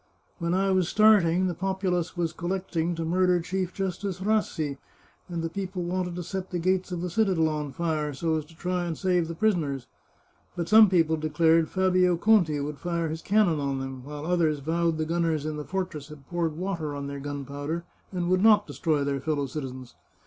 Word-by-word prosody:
When 170 +1 0
I 195 +1 +2
was 185 -2 +2
starting, 190 -5 +5
the 180 - 0
populace 185 -1 -1
was 170 -2 -1
collecting 175 -1 -2
to 165 0 -3
murder 180 +1 +3
Chief 185 +1 -2
Justice 190 -1 -3
Rassi, 190 -8 0 0.5
and 170 -2 -3
the - - 0
people 185 +1 -4
wanted 180 0 -2
to 180 - -4
set 190 +2 -5
the 180 - -2
gates 185 +2 0
of 175 -1 -3
the 180 - -2
citadel 185 -5 +2
on 150 -2 -3
fire, 155 0 -1
so 160 +4 -1
as 155 -2 -2
to 160 +1 -19
try 180 0 -1
and 165 -2 -3
save 180 -3 +1
the 165 - -5
prisoners. 160 - 0 0.7
But 170 -2 -3
some 215 -1 +8
people 165 -3 +3
declared 160 +1 +3
Fabio 185 -2 +3
Conti 170 -6 +3
would 145 0 -4
fire 170 -2 -1
his 160 +1 -4
cannon 200 -6 +2
on 140 -1 -1
them, 135 -1 -6
while 145 +2 -7
others 165 -3 +2
vowed 165 +3 0
the 155 - -1
gunners 165 -2 0
in 155 -1 -3
the 150 - -4
fortress 180 -7 -4
had 150 -3 -13
poured 165 -3 -2
water 170 -5 -3
on 140 0 -4
their 140 0 -5
gun 145 0 -5
powder, 145 +5 -4 0.3
and 180 -2 -2
would 185 +1 +2
not 210 -1 +6
destroy 155 -4 0
their 140 -1 -1
fellow 145 -1 -1
citizens. 130 -2 -7
170 Hz, 200 wpm, -27 LUFS, 155-185 Hz, 0.7 s, some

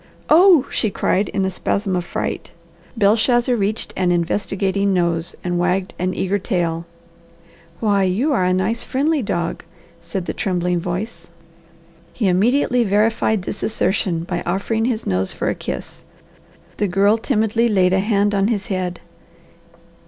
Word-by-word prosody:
"Oh!" 335 -3 +7
she 220 - 0
cried 195 0 0
in 195 - -1
a 190 - -1
spasm 195 +1 -1
of 180 - -1
fright. - - -4 0.4
Belshazzar 235 +4 +3
reached 210 0 -2
an 180 -1 +1
investigating 195 +2 0
nose 170 -1 0
and 175 -1 -1
wagged 180 +2 0
an 185 +1 -1
eager 195 +2 0
tail. 170 -4 -2 0.9
"Why 205 -3 +2
you 205 +11 +1
are 190 - +2
a 180 - +2
nice 190 +6 0
friendly 295 +3 0
dog!" 175 -6 -2 0.4
said 170 +2 -5
the - - -3
trembling 180 -2 -1
voice. 175 0 -5 0.8
He 215 - 0
immediately 240 +6 +2
verified 215 0 +1
the - - -4
assertion 190 -4 -1
by 175 0 -3
offering 210 +5 -1
his 235 -3 -1
nose 95 0 -1
for - - -2
a - - 0
kiss. - - -6 0.8
The 205 - +1
girl 200 +4 +3
timidly 225 -1 +1
laid 185 -3 +3
a 190 - +3
hand 205 0 +1
on 200 0 +2
his 220 -1 -2
head. 180 -1 -3
195 Hz, 150 wpm, -20 LUFS, 180-220 Hz, 0.9 s, Oh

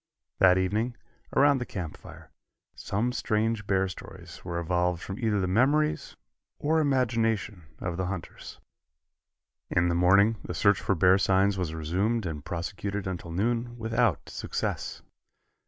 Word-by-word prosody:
That 90 -1 +6
evening, 110 +6 0 0.4
around 140 0 +5
the - - -2
camp 85 -5 -5
fire, - - -14 0.4
some 110 +5 -2
strange 110 -3 -1
bear 95 -1 +2
stories 95 - -10
were 85 -1 -4
evolved 90 0 0
from 95 +1 -6
either 110 -3 +1
the 95 - 0
memories 140 +10 +1 0.4
or 160 +2 +1
imagination 115 - 0
of 85 -1 -4
the 95 -1 -1
hunters. 95 -2 -7 1.1
In 85 0 +2
the - - +1
morning 100 +6 +4
the 90 - -5
search 100 +4 +3
for 100 - +1
bear 90 +3 +5
signs 95 +1 +3
was 90 -4 -3
resumed 95 +8 0
and 75 -4 -4
prosecuted 100 +3 -4
until 90 -2 -5
noon 120 +6 -1
without 115 - 0
success. - - -4
100 Hz, 140 wpm, -28 LUFS, 90-115 Hz, 1.1 s, That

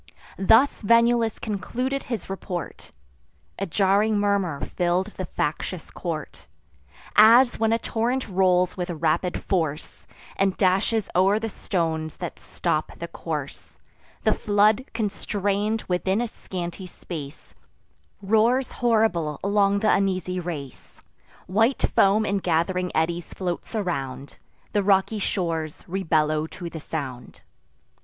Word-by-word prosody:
Thus 225 +8 +4
Venulus 230 0 +3
concluded 250 +6 -2
his 235 -6 -5
report. 185 -3 -6 0.7
A 195 - -2
jarring 200 +4 +2
murmur 200 -7 +1
fill'd 180 +3 -1
the 185 - -4
factious 160 +3 -3
court: 155 - -6 0.7
As, 235 +4 +7
when 225 0 +2
a 230 - +3
torrent 235 +3 -1
rolls 185 -2 +2
with 180 -1 -4
rapid 170 +2 0
force, 160 -5 -2 0.3
And 195 -1 +1
dashes 195 +3 +2
o'er 190 +3 +4
the 225 +1 -3
stones 160 -6 -2
that - - -6
stop - - -2
the - - -5
course, - - -6 0.5
The - - +4
flood, 210 +3 +2
constrain'd 205 0 -1
within 190 +3 0
a 240 - 0
scanty 180 -3 -6
space, 155 -5 -9 0.7
Roars 225 +6 +2
horrible 215 - +1
along 200 0 +2
th' - - -10
uneasy 185 -3 +1
race; 155 -7 -8 0.4
White 225 +8 +1
foam 205 +2 +4
in 200 -1 0
gath'ring 180 +1 0
eddies 170 +2 -1
floats 180 +4 -4
around; 140 -9 -4 0.3
The 205 - +2
rocky 195 +2 +2
shores 165 -5 -2
rebellow 155 -4 +1
to 170 0 -8
the 160 - -6
sound. 135 -6 -6
190 Hz, 120 wpm, -24 LUFS, 170-215 Hz, 0.7 s, As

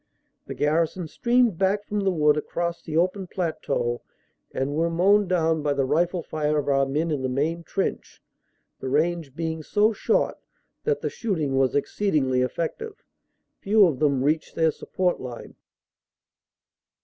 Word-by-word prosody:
The - - -6
garrison 160 +3 0
streamed 240 0 +2
back 200 +2 +1
from 210 0 -2
the 195 -1 +1
wood 150 -4 +3
across 170 +3 -3
the 160 -1 -3
open 185 +2 +1
plateau 150 -9 -2 0.5
and 135 +2 -2
were 165 +3 +1
mown 195 +4 +3
down 165 -3 +1
by 145 -1 +1
the 140 -1 0
rifle 170 +5 +1
fire 150 -1 -1
of 145 -1 -1
our 135 -1 +2
men 155 +4 -1
in 145 -3 -1
the 130 - -1
main 155 +6 -1
trench, 190 +4 -3 0.6
the 130 - -4
range 155 0 0
being 160 -1 -3
so 210 +7 +2
short - - 0 0.5
that 455 -1 0
the - - -1
shooting 160 - -2
was 135 -1 +2
exceedingly 145 -5 +1
effective. 170 - -4 0.6
Few 205 0 +5
of 150 -8 0
them 140 -4 +2
reached 155 +3 0
their 160 -1 +3
support 180 +3 -1
line. 125 -2 -8
160 Hz, 155 wpm, -25 LUFS, 145-185 Hz, 0.6 s, Few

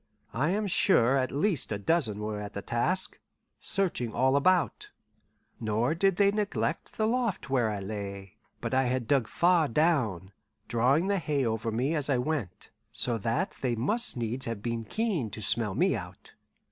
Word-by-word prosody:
I 140 +7 +1
am 210 +3 0
sure 135 - +3
at 130 -1 0
least 155 - 0
a 105 - -1
dozen 110 - +1
were 105 -1 -3
at 105 0 -7
the 100 - -5
task, 180 +11 -1 0.4
searching 165 - 0
all 130 +2 +3
about; 170 +1 +2 0.7
nor 115 +5 0
did 195 +2 +2
they 200 +1 +4
neglect 210 0 -2
the 215 - +1
loft 225 - -1
where 120 -4 +2
I 105 -2 -3
lay. 100 -1 -6 0.3
But - - -3
I 130 0 +3
had 125 -1 -1
dug 135 -4 +2
far 170 -3 +3
down, 115 - +1 0.4
drawing 125 +8 +2
the 200 0 +1
hay 145 -5 0
over 110 0 -1
me 125 +8 0
as 150 -3 -1
I 135 - +3
went, 125 - -3 0.2
so 120 -2 +1
that 140 - -1
they 125 -3 0
must 210 - 0
needs 120 +2 -3
have 115 -3 -4
been 115 -1 -3
keen 195 - -1
to 105 - -8
smell 105 -1 +3
me 180 -4 +2
out. 90 -3 -9
130 Hz, 175 wpm, -28 LUFS, 110-170 Hz, 0.7 s, they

